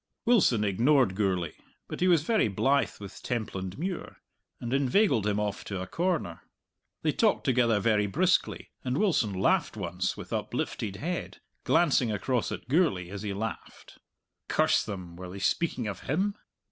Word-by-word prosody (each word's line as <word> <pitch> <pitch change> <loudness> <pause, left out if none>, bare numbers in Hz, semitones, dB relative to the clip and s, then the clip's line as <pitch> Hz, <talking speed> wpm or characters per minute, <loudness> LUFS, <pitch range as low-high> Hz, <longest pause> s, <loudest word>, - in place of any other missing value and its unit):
Wilson 185 - +4
ignored 120 +3 +3
Gourlay, 95 -5 0 0.4
but - - -6
he 185 - +3
was 170 -4 +4
very 220 - +2
blithe 135 +8 +1
with 100 0 -10
Templandmuir, 120 - -4 0.4
and 120 +1 -4
inveigled 135 - +3
him 105 0 +1
off 105 -1 -2
to 100 -2 -4
a 95 - -4
corner. 165 - -2 0.6
They - - +3
talked - - +2
together 120 -4 +3
very 105 -1 +2
briskly, 180 - +1
and 125 +1 -1
Wilson 160 - +2
laughed 130 - +1
once 90 -1 -2
with - - -8
uplifted 100 -3 -3
head, 170 - -4 0.3
glancing 150 -8 +3
across 115 +4 -1
at - - -6
Gourlay 130 - +2
as 100 -1 -6
he 105 -1 -3
laughed. 105 +2 -6 0.5
Curse - - +3
them, 90 -4 -7
were 90 0 -7
they 95 - -8
speaking 125 - 0
of 100 - -4
him? 190 +9 0
115 Hz, 155 wpm, -28 LUFS, 100-155 Hz, 0.6 s, Wilson